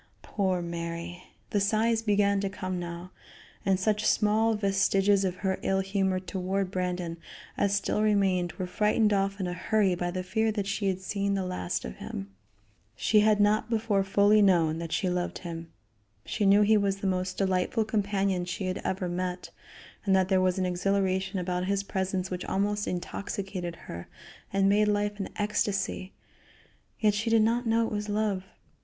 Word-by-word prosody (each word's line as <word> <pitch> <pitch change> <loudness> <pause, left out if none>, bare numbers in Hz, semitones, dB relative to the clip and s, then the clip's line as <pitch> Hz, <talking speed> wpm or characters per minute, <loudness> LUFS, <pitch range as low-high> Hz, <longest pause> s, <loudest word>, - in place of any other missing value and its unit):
Poor 185 -4 -1
Mary! 170 +1 -5 0.3
The 205 - +2
sighs 220 +3 +2
began 200 -2 +2
to 200 - -1
come 185 -2 -4
now, 175 +1 -6 0.5
and 190 -1 +2
such 210 +2 +1
small 220 +2 +3
vestiges 195 0 +2
of 185 -2 -1
her 190 0 0
ill 195 0 +1
humor 190 -1 0
toward 190 0 -2
Brandon 180 -2 -2 0.4
as 200 0 +1
still 200 +1 0
remained 195 -5 +2
were 185 - -4
frightened 210 +3 +2
off 195 0 0
in 190 - -1
a 175 - -2
hurry 205 0 +1
by 175 0 -2
the 185 +1 -3
fear 220 +4 0
that 205 -2 -2
she 200 0 -1
had 190 -1 -1
seen 200 +1 -1
the 190 -1 -1
last 180 - -3
of 60 - -7
him. 95 0 -7 0.6
She 215 - +3
had 210 0 +4
not 210 +2 +3
before 220 -3 +1
fully 205 +2 +4
known 165 -5 +3
that 165 -1 -5
she 190 - 0
loved 180 0 -1
him. 165 -1 -7 0.5
She 205 -3 0
knew 200 +2 +6
he 215 +1 +5
was 200 -1 +1
the 195 - -6
most 185 -1 -1
delightful 190 +3 +1
companion 200 -4 0
she 180 +2 -4
had 185 0 -2
ever 185 -1 -2
met, 180 +1 -3 0.5
and 195 -2 +3
that 190 -1 +2
there 190 -1 +3
was 185 0 +2
an 185 - 0
exhilaration 190 +1 0
about 180 0 -1
his 200 +1 0
presence 190 -1 -2
which 180 0 -3
almost 205 +1 -1
intoxicated 185 -1 -4
her 85 +1 -7 0.4
and 195 0 +2
made 210 +1 +4
life 205 0 0
an 195 - -3
ecstasy, 200 -2 -1 0.9
yet 210 -2 +3
she 215 +3 -1
did 225 -1 +5
not 235 +2 +1
know 225 0 +3
it - - -4
was 210 0 -3
love. 205 -3 0
195 Hz, 180 wpm, -28 LUFS, 185-205 Hz, 0.9 s, knew